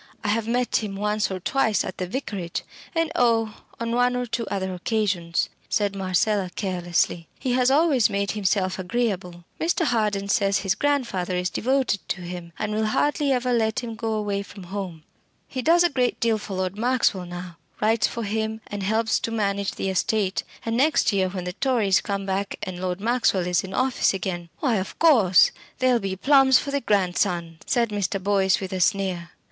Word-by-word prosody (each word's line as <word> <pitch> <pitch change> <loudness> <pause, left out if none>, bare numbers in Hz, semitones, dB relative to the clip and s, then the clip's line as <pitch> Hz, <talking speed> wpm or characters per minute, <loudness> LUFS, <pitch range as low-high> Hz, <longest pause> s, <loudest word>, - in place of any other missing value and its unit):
I 210 - -1
have 220 +1 0
met 245 +1 +1
him 210 -3 -3
once 210 +1 0
or 190 -1 -4
twice 220 +2 +1
at 185 - -7
the 185 - -2
Vicarage 195 -6 -4 0.3
and 330 -1 +1
oh! 230 -7 +2 0.2
on 230 0 -2
one 245 +1 +2
or 250 0 -1
two 235 -1 -3
other 190 -1 -2
occasions," 180 -3 0 0.2
said 205 -1 0
Marcella, 195 +1 +1
carelessly. 175 -3 -1
"He 260 - -2
has 250 0 +3
always 280 -5 +4
made 200 0 -1
himself 190 -2 0
agreeable. 185 -3 -2 0.2
Mr. 335 +1 +1
Harden 210 -6 0
says 200 -1 +2
his 195 -2 +1
grandfather 235 -12 0
is 180 0 -1
devoted 260 -3 +1
to 190 - -2
him, 175 -1 -7
and 215 -1 -2
will 215 0 0
hardly 290 +5 +1
ever 250 -1 +1
let 220 -1 +1
him 235 -2 -5
go 225 0 -3
away 205 -2 -1
from 200 -1 -11
home. 180 -6 -5 0.4
He 260 - -4
does 340 +6 +5
a - - +5
great 255 -6 0
deal 225 -2 +2
for 200 -2 -6
Lord 185 +2 -2
Maxwell 230 -6 +1
now: 175 -1 -8 0.2
writes 220 +1 +2
for 230 - -5
him, 220 +1 -2
and 205 -1 -6
helps 220 +3 +1
to - - -3
manage 200 -3 -1
the 195 - -3
estate; 195 0 0 0.2
and 225 0 -1
next 275 -3 +3
year, 190 -1 +2
when 185 -1 -5
the 180 0 -4
Tories 220 -5 +2
come 200 -1 -3
back 195 +1 -2
and 185 -1 -5
Lord 180 0 -2
Maxwell 220 -4 +1
is 180 -1 +1
in 190 0 -6
office 255 -6 +2
again 175 -3 -4
" - - -38
"Why, 250 -7 +2
of 190 0 -4
course, 225 - +5 0.3
there'll 255 -2 +3
be 195 -2 -3
plums 270 +4 +5
for 280 - -3
the 280 0 0
grandson," 180 -5 0
said 235 -2 +2
Mr. 200 -2 -1
Boyce 190 -1 +2
with 190 -1 -5
a 185 - -2
sneer. 185 -3 0
205 Hz, 195 wpm, -24 LUFS, 185-235 Hz, 0.4 s, does